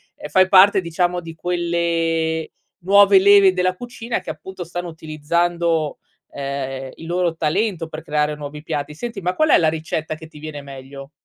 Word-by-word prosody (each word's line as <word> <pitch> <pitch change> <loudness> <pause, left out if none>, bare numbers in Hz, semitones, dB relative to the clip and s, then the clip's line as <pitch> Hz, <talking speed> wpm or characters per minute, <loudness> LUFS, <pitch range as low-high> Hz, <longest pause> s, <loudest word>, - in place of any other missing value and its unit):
ehm, 150 - -9
fai 185 +5 +4
parte 195 +1 +6
diciamo 175 +1 -1
di 165 -1 -9
quelle 165 -2 -1 0.3
nuove 200 +2 +6
leve 200 -1 +6
della 185 0 0
cucina, 240 +1 -5
che - - -9
appunto 190 -1 -7
stanno 175 +1 -5
utilizzando, 160 0 -1 0.3
ehm, 135 -1 -5
il 165 - -11
loro 175 -1 0
talento 165 +2 -1
per 155 0 -8
creare 150 0 0
nuovi 150 0 -8
piatti. 150 -1 -4
Senti 230 +6 -6
ma 180 0 -1
qual 310 +10 +1
è - - +7
la 160 - +2
ricetta 160 0 -3
che 160 0 -12
ti 155 - -16
viene 150 -1 -7
meglio? 135 0 -10
165 Hz, 170 wpm, -20 LUFS, 150-185 Hz, 0.3 s, è